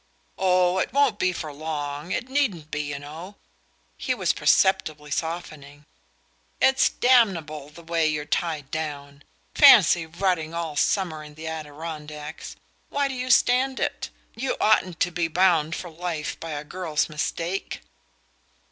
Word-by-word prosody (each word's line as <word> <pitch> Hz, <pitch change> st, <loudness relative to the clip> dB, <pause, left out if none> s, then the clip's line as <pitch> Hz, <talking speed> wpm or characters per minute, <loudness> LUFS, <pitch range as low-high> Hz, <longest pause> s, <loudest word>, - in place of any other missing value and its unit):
"Oh, 185 Hz, -1 st, +3 dB
it -, -, -1 dB
won't 275 Hz, -7 st, +2 dB
be 185 Hz, -, +2 dB
for 155 Hz, -4 st, -6 dB
long 150 Hz, +1 st, -5 dB
it 240 Hz, -, -2 dB
needn't 215 Hz, -, -1 dB
be, 150 Hz, -, -1 dB
you 145 Hz, -1 st, -4 dB
know." 160 Hz, +7 st, -9 dB, 0.6 s
He -, -, -1 dB
was -, -, +1 dB
perceptibly 155 Hz, -6 st, +2 dB
softening. 150 Hz, -3 st, -5 dB, 0.7 s
"It's 265 Hz, 0 st, +4 dB
damnable, 170 Hz, -, +2 dB
the 170 Hz, +3 st, -14 dB
way 165 Hz, -1 st, +1 dB
you're 150 Hz, -1 st, -2 dB
tied 155 Hz, -3 st, -2 dB
down. 145 Hz, -2 st, -5 dB, 0.3 s
Fancy 165 Hz, -2 st, +7 dB
rotting 170 Hz, -1 st, -1 dB
all 165 Hz, -3 st, -3 dB
summer 160 Hz, 0 st, 0 dB
in 150 Hz, 0 st, -13 dB
the 160 Hz, +1 st, -9 dB
Adirondacks! 150 Hz, -1 st, -7 dB, 0.3 s
Why 280 Hz, -1 st, 0 dB
do -, -, -4 dB
you 255 Hz, 0 st, -4 dB
stand 255 Hz, +2 st, +3 dB
it? -, -, -2 dB, 0.3 s
You 260 Hz, +4 st, -2 dB
oughtn't 185 Hz, -5 st, +2 dB
to 180 Hz, -, +2 dB
be 170 Hz, -1 st, -1 dB
bound 165 Hz, -2 st, +2 dB
for 175 Hz, -, -7 dB
life 165 Hz, -2 st, -4 dB
by 165 Hz, -, -7 dB
a 145 Hz, 0 st, -4 dB
girl's 160 Hz, -1 st, -2 dB
mistake." 165 Hz, +4 st, -3 dB
165 Hz, 145 wpm, -25 LUFS, 150-185 Hz, 0.7 s, Fancy